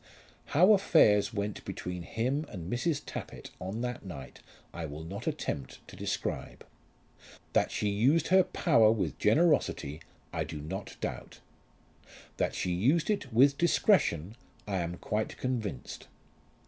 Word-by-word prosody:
How 185 +6 +8
affairs 140 - +4
went 105 -2 -3
between 90 0 -5
him 130 - -2
and 90 -1 -6
Mrs. 145 +4 0
Tappitt - - -7
on 95 +5 -4
that 125 0 -4
night 75 -9 -9 0.3
I 85 -2 -4
will 75 +2 -7
not 100 +7 -7
attempt 65 - -4
to - - -11
describe. - - -4 0.9
That - - +3
she 105 - -1
used 135 +11 +2
her 190 +1 +7
power 115 -12 +4
with 110 -3 -2
generosity 105 - +2 0.3
I - - 0
do 75 - -7
not 95 +7 -6
doubt. - - -5 1.0
That - - 0
she 90 - -1
used 135 - +2
it 145 -11 -2
with 135 +5 +5
discretion 115 - +2 0.3
I 100 -2 -1
am 85 0 -3
quite 105 0 -2
convinced. 110 - -4
110 Hz, 135 wpm, -30 LUFS, 90-140 Hz, 1.0 s, How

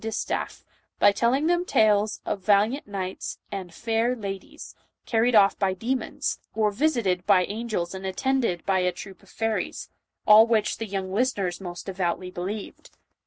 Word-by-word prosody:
145 225 0 -2
distaff, - - -18 0.3
by 205 - +6
telling 245 +8 +1
them 350 +1 +2
tales 215 - +2
of 205 - -2
valiant 210 +7 +2
knights 190 -2 -5
and 190 -3 -5
"faire 225 +5 0
ladyes" 200 - -7 0.3
carried 230 +1 +2
off 200 -2 +5
by 190 -2 +1
demons, 245 +7 -2 0.2
or 215 -1 +2
visited 205 - +1
by 180 -1 +5
angels 210 -5 -3
and 190 0 -7
attended 190 -1 -1
by 190 -1 +2
a 180 0 +1
troop 190 +2 -11
of 195 - -21
fairies 225 -1 -3 0.2
— - - -58
all 215 +2 +8
which 220 -3 +1
the 225 - -4
little 190 -1 -4
listeners 200 -5 -1
most 175 -2 -7
devoutly 185 -1 -2
believed. 195 +4 -6
205 Hz, 165 wpm, -25 LUFS, 190-230 Hz, 0.3 s, all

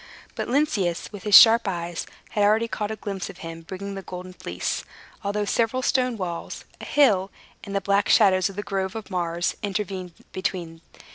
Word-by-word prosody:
But - - -4
Lynceus, 235 - 0
with 205 -2 -8
his 210 -1 +10
sharp 225 -1 +8
eyes, 175 -2 -3 0.2
had 205 - 0
already 215 +3 +3
caught 210 -2 -3
a 220 - -3
glimpse 200 -3 -5
of - - -10
him, 165 0 -7
bringing 195 +4 -6
the 195 - -5
Golden 185 0 -8
Fleece, 90 - -3 0.4
although 205 +1 -1
several 235 +4 0
stone 250 -3 +1
walls, 175 -4 -5
a - - -8
hill, 205 -10 +3 0.3
and 200 -2 -6
the 200 - +1
black 200 +1 +1
shadows 190 -3 +5
of 195 - -10
the 205 - -4
Grove 195 -1 -2
of 220 -2 -7
Mars, 175 -1 -1
intervened 195 -3 -3 0.2
between. 175 -3 -4
195 Hz, 185 wpm, -25 LUFS, 180-210 Hz, 0.4 s, his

